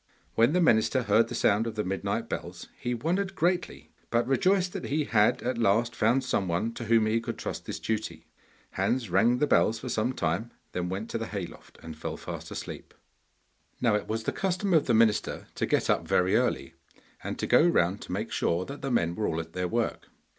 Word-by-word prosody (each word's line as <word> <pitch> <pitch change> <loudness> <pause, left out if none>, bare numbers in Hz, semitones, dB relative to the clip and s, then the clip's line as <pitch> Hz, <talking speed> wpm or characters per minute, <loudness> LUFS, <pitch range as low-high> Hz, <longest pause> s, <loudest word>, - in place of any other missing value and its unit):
When 115 +6 +3
the 180 - +3
minister 130 -3 +3
heard 110 +2 +3
the - - -6
sound 105 +3 +2
of 110 - -5
the 105 - -1
midnight 95 +1 -2
bells - - -6
he 125 0 -3
wondered 185 - -1
greatly, 175 +2 -1 0.2
but 120 0 +2
rejoiced 185 +7 +2
that 195 - -5
he 150 +2 0
had 105 -6 +2
at 125 -1 -1
last 115 +2 +2
found 120 +4 +2
some 100 -7 0
one 90 +7 -1
to 120 - -6
whom 115 0 +4
he 110 +1 +1
could 115 0 -5
trust - - -5
this - - -4
duty. 105 -8 -3 0.5
Hans 120 -7 -1
rang 120 +6 +4
the 150 - +2
bells 115 -5 +3
for - - -6
some 115 +4 0
time, 90 +4 -1 0.2
then 90 -1 -3
went 100 +5 -4
to 115 - -2
the 115 - -4
hay 100 -4 -4
loft, - - -15
and 80 -1 -8
fell 80 - -5
fast - - -7
asleep. - - -8 0.8
Now 115 -3 +2
it 105 - -1
was 110 +1 -2
the - - -1
custom 190 +1 -1
of 160 - +4
the 120 - +3
minister 110 -1 +2
to - - -2
get - - +1
up - - +1
very 90 +3 +2
early, 120 -8 0 0.5
and - - -4
to - - -2
go - - +5
round 100 - +2
to - - -8
make 105 +5 -3
sure 85 +2 0
that 140 0 -8
the 135 - -3
men 85 -9 +1
were 105 +4 -1
all 80 - -1
at 80 0 -7
their 90 0 -1
work. 115 +4 -2
115 Hz, 220 wpm, -28 LUFS, 100-130 Hz, 0.8 s, go